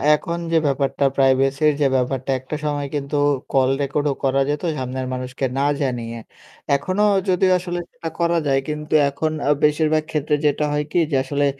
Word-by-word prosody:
এখন 170 +3 -4
যে 165 - +4
ব্যাপারটা 140 0 0
প্রাইভেসির 135 +2 +3
যে 140 - +5
ব্যাপারটা 130 +1 -1
একটা 130 +4 -6
সময় 145 -1 -1
কিন্তু 140 +1 -3 0.4
কল 130 -1 +3
রেকর্ডও 145 +1 0
করা 135 0 +2
যেত 150 +2 -2
সামনের 130 0 -3
মানুষকে 130 +1 -3
না 140 - +1 0.2
জানিয়ে। 120 -4 -2 0.6
এখনো 185 +8 0 0.3
যদিও 185 +1 +3
আসলে 175 -1 -4
সেটা 245 -10 -6
করা 170 0 +2
যায় 135 -1 +3
কিন্তু 150 0 -4 0.2
এখন 155 +3 -2 0.2
আ - - +3
বেশিরভাগ 155 +1 +2
ক্ষেত্রে 150 0 0
যেটা 150 +1 +2
হয় 150 0 0
কি - - +2
যে - - +1
আসলে 145 +1 0
145 Hz, 170 wpm, -21 LUFS, 135-155 Hz, 0.6 s, যে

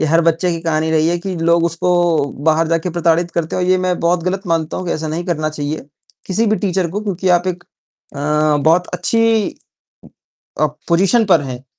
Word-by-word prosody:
ये 155 - +1
हर 165 +2 +3
बच्चे 165 +2 +1
की 165 - -4
कहानी 160 -1 0
रही 160 0 +2
है 175 - +1
कि 190 +2 -5
लोग 170 0 +2
उसको 170 +2 -1 0.6
बाहर 160 +1 +3
जाकर 165 +2 0
प्रताड़ित 170 0 +1
करते 165 -2 -2
हैं 185 - 0
और 180 - -1
ये 185 - +4
मैं 185 -1 -1
बहुत 170 0 +1
गलत 190 +1 -1
मानता 165 -2 -1
हूँ 185 - -5
कि 170 - 0
ऐसा 155 0 -3
नहीं 165 +3 -3
करना 155 -3 -1
चाहिए 150 0 -4 0.4
किसी 215 +4 0
भी 215 0 +2
टीचर 190 -4 -1
को। 205 +4 -3
क्योंकि 190 -3 -2
आप 175 0 +3
एक 180 -1 -3 0.5
अ, 150 +1 +1
बहुत 170 +3 +3
अच्छी 225 +3 +1 1.1
अ, 155 - +4 0.2
पोज़ीशन 195 +7 +3
पर 175 -5 +4
हैं। 130 -2 -7
170 Hz, 210 wpm, -17 LUFS, 160-185 Hz, 1.1 s, ये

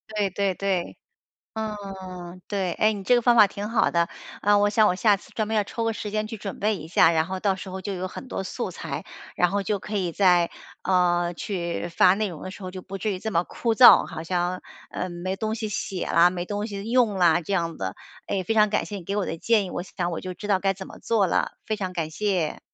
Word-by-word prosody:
对 205 -2 +1
对 195 +1 0
对。 190 -3 -2 0.6
嗯， 190 -4 -6
对， 190 -4 -1
哎， 215 +1 +3
你 205 -2 -6
这 245 - +4
个 240 - +3
方 240 0 +5
法 215 -3 +8
挺 205 +2 -6
好 230 - +2
的。 170 0 +1 0.3
呃， 205 0 +5
我 205 - +4
想 215 +1 +4
我 - - +1
下 205 +2 +4
次 195 - -17
专 215 -1 -2
门 220 - 0
要 210 - +2
抽 230 +3 -4
个 225 - 0
时 210 -1 -5
间 215 0 -1
去 220 +1 -6
准 200 -1 -6
备 210 +1 +1
一 160 -3 -8
下， 165 0 +5
然 160 -1 +2
后 185 0 -4
到 195 -1 +1
时 190 0 -8
候 190 - -5
就 195 +1 -4
有 185 0 -3
很 260 - -9
多 195 - -4
素 - - -4
材， - - -6 0.3
然 180 - +3
后 200 0 0
就 205 +1 -1
可 210 +2 -5
以 180 -4 -1
在， 180 -3 +4 0.3
呃， 175 -2 +2
去 175 -1 -3
发 180 +2 +5
内 210 +1 0
容 170 -5 -9
的 185 - -6
时 190 - -11
候， 185 - -5
就 185 0 -8
不 195 +1 -7
至 210 +3 -1
于 190 - -3
这 220 - -4
么 170 - +3
枯 230 +5 -2
燥， 250 - +9
好 160 -1 -7
像， 180 +1 -1 0.3
嗯， 185 - -4
没 180 +2 -3
东 220 0 -2
西 225 -1 -3
写 190 -2 -3
啦， 170 +1 +5
没 180 -1 -4
东 205 +2 -3
西 205 0 -6
用 240 -4 +3
啦， 175 -3 +4
这 185 +4 -3
样 165 -3 -1
的。 95 0 -3 0.3
哎， 195 - -1
非 205 - -1
常 215 -1 +5
感 210 - 0
谢 205 - -6
你 185 - -8
给 200 +4 -3
我 205 - +1
的 165 - -4
建 220 +2 +2
议， 185 - -6
我 - - -3
想 175 -1 -3
我 165 - -4
就 185 -1 -6
知 205 - -8
道 190 -2 +3
该 195 -1 +1
怎 190 0 -8
么 - - -12
做 220 -4 +2
了， - - 0
非 215 - -1
常 185 -3 -4
感 160 -3 -2
谢。 185 -2 -1
195 Hz, 280 characters per minute, -25 LUFS, 180-210 Hz, 0.6 s, 燥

